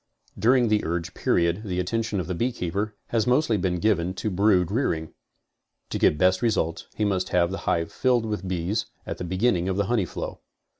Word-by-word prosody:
During 120 +3 +4
the 105 -1 +2
urge 85 +1 -3
period 85 +2 +1
the 95 -4 -3
attention 110 +2 -1
of 90 - -2
the 90 - -3
beekeeper 105 -1 -2
has 115 -2 +1
mostly 125 -2 +3
been 90 -2 0
given 90 -2 +1
to 105 - -2
brood 95 -2 +3
rearing. 85 - -1 0.8
To - - -2
get 75 - +4
best 95 +2 +3
results 95 -8 0
he 105 - 0
must 95 -3 0
have 85 0 +2
the 100 - -4
hive 85 0 0
filled 125 -3 +2
with 105 -3 -3
bees 95 +4 -1 0.2
at - - -5
the - - -3
beginning 95 0 +1
of 95 - -1
the 100 - +1
honey 105 -2 +1
flow. - - -6
95 Hz, 195 wpm, -25 LUFS, 90-110 Hz, 0.8 s, During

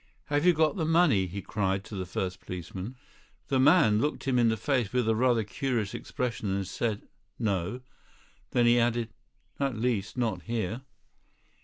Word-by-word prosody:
"Have 145 +4 +3
you 180 - +7
got 160 +4 +2
the 165 - 0
money!" 160 - +3
he 95 +2 -6
cried 95 -2 -1
to 110 - -12
the 95 -2 -4
first 95 0 -3
policeman. 90 +6 -6 0.5
The 135 - +2
man 130 -7 +5
looked 150 - -1
him 130 -2 +1
in 115 -1 +4
the 110 - 0
face 125 -2 0
with 125 -3 +1
a 110 - +4
rather 120 0 +2
curious 115 -2 -2
expression 115 -4 -3
and 100 -1 -2
said: 105 +2 -2 0.3
"No." 105 +1 -1 0.7
Then 120 - +2
he 120 +1 +5
added: 120 -1 +1 0.5
"At 135 -4 0
least, 110 -3 -1
not 110 -7 -1
here." 115 +1 -3
115 Hz, 170 wpm, -28 LUFS, 100-130 Hz, 0.7 s, you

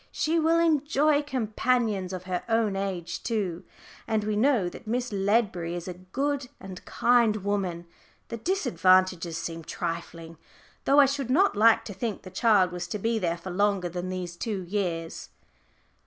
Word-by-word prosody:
She 325 +2 +1
will 325 +1 +3
enjoy 300 -2 +3
companions 225 -6 0
of 185 -1 -5
her 185 -1 -2
own 225 -3 +2
age 190 -3 -3
too. 195 -7 -2 0.4
And 220 -2 0
we 210 0 -1
know 230 -4 +3
that 215 +6 -9
Miss 245 +2 -1
Ledbury 195 -4 0
is 175 0 -6
a 180 - -4
good 260 +9 -3
and 190 -1 -9
kind 235 -3 +3
woman 190 -4 -2 0.4
the 230 - -4
disadvantages 185 - +2
seem 165 0 -5
trifling, 165 0 -6 0.5
though 280 +1 +5
I 285 - +8
should 275 -2 -2
not 345 - +3
like 225 +2 +5
to 205 - -6
think 215 +2 -4
the 185 - -10
child 195 -3 +3
was 175 -1 -5
to 190 - -3
be 225 +2 0
there 170 -3 -1
for 180 +2 -7
longer 200 -1 +1
than 180 +1 -4
these 180 -2 -5
two 195 +1 -3
years." 175 -3 -3
200 Hz, 165 wpm, -27 LUFS, 180-240 Hz, 0.5 s, I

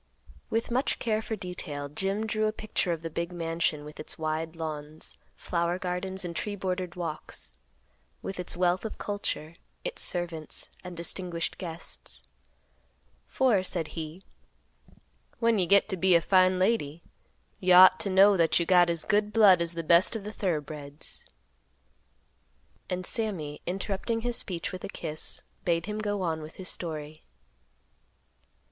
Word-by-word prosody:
With 225 +1 -1
much 255 +3 +1
care 220 -2 0
for 220 - -3
detail, 170 -7 -5
Jim 195 +8 -2
drew 215 0 +1
a - - +1
picture 215 -4 -1
of 165 -1 -3
the 165 - -3
big 170 +2 -2
mansion 165 -3 -1
with 150 0 -11
its - - -6
wide 160 +1 -2
lawns, 155 -1 -5 0.2
flower 170 0 -1
gardens 185 +1 -2
and 170 -1 -5
tree 205 +3 -2
bordered 185 -3 -3
walks; 165 -3 -5 0.7
with 195 - -5
its 180 - -3
wealth 180 0 +2
of 220 - -5
culture, 185 -5 -3 0.3
its - - -3
servants, 170 -3 -3
and 180 -1 -8
distinguished 170 0 -1
guests; 170 -3 -6 1.0
for, 245 -7 +3
said 175 -4 -1
he, 160 +3 -6 1.1
"When 230 -2 +3
you 180 - +2
get 200 +2 +5
to 190 - -2
be 185 0 +5
a 170 - +6
fine 185 +1 +4
lady, 175 -6 +1 0.6
you 180 -1 +5
ought 185 +1 +9
to 200 - -1
know 195 +2 +7
that 165 0 +4
you 170 - +1
got 175 -1 +6
as 170 -1 0
good 210 +1 +2
blood 205 -5 +7
as 170 0 -1
the 165 - -3
best 170 +7 +5
of 220 - -4
the 210 +1 -6
thorough 175 -8 0
breds." 145 0 -8 1.6
And 180 0 -2
Sammy, 180 -12 -1
interrupting 195 +5 -1
his 240 0 -1
speech 175 -6 -1
with 185 - -7
a - - -4
kiss, 155 -5 -1 0.2
bade 170 -1 +1
him 210 +1 -3
go 205 -2 -1
on 160 -2 -1
with 155 +1 -9
his 185 - -5
story. 155 -2 -4
180 Hz, 160 wpm, -29 LUFS, 165-200 Hz, 1.6 s, ought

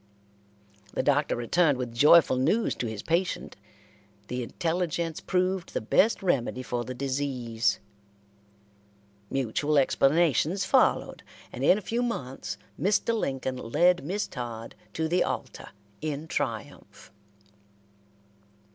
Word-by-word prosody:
The - - 0
Doctor 145 +1 +2
returned 145 +5 +2
with 125 -2 -4
joyful 145 +2 +6
news 165 - +2
to 120 - -4
his 110 -2 -6
patient. 170 +2 -1 0.7
The 125 0 -2
intelligence 165 +4 -2
proved 185 -1 -1
the - - +2
best 195 - +2
remedy 130 -7 0
for 120 -1 -3
the 130 +1 -6
disease. 125 -4 -1 1.5
Mutual 135 +3 0
explanations 155 - +2
followed, 260 -2 +2 0.3
and - - -5
in 185 - +5
a - - -4
few 230 +5 -2
months 140 - -4 0.2
Mr. 205 +4 +2
Lincoln 135 - -2
led 175 +9 +2
Miss 195 +8 -2
Todd 115 -3 -6 0.2
to 160 0 -1
the 175 +2 +2
altar - - -5 0.3
in 155 0 -4
triumph. 115 -6 -5
145 Hz, 115 wpm, -27 LUFS, 125-175 Hz, 1.5 s, joyful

